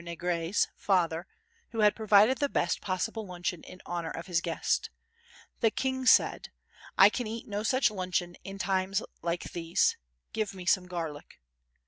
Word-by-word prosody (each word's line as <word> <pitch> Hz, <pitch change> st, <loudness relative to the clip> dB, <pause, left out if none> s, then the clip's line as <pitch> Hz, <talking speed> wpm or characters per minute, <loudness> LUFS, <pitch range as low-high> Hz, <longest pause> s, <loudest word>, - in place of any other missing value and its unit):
Negri's) 170 Hz, +1 st, -1 dB
father 175 Hz, -2 st, +1 dB, 0.4 s
who 225 Hz, -, -2 dB
had 210 Hz, -1 st, +5 dB
provided 220 Hz, +3 st, +4 dB
the 285 Hz, -, +1 dB
best 170 Hz, -, 0 dB
possible 205 Hz, +4 st, -2 dB
luncheon 175 Hz, -1 st, -4 dB
in 185 Hz, -, -12 dB
honour 170 Hz, -2 st, -3 dB
of 165 Hz, -, -6 dB
his 175 Hz, -2 st, 0 dB
guest. -, -, -1 dB, 0.7 s
The 225 Hz, -, +4 dB
King 260 Hz, +2 st, -2 dB
said: -, -, +4 dB, 0.5 s
"I -, -, +9 dB
can 245 Hz, -3 st, -3 dB
eat 225 Hz, +1 st, -6 dB
no 205 Hz, 0 st, -3 dB
such 240 Hz, +2 st, +2 dB
luncheon 180 Hz, -3 st, -2 dB
in 195 Hz, 0 st, -7 dB
times 190 Hz, 0 st, 0 dB, 0.2 s
like 170 Hz, +1 st, -2 dB
these—give 165 Hz, -, -1 dB
me 185 Hz, -1 st, -8 dB
some 185 Hz, 0 st, +2 dB
garlic." 165 Hz, -5 st, -6 dB
185 Hz, 150 wpm, -29 LUFS, 170-215 Hz, 0.7 s, I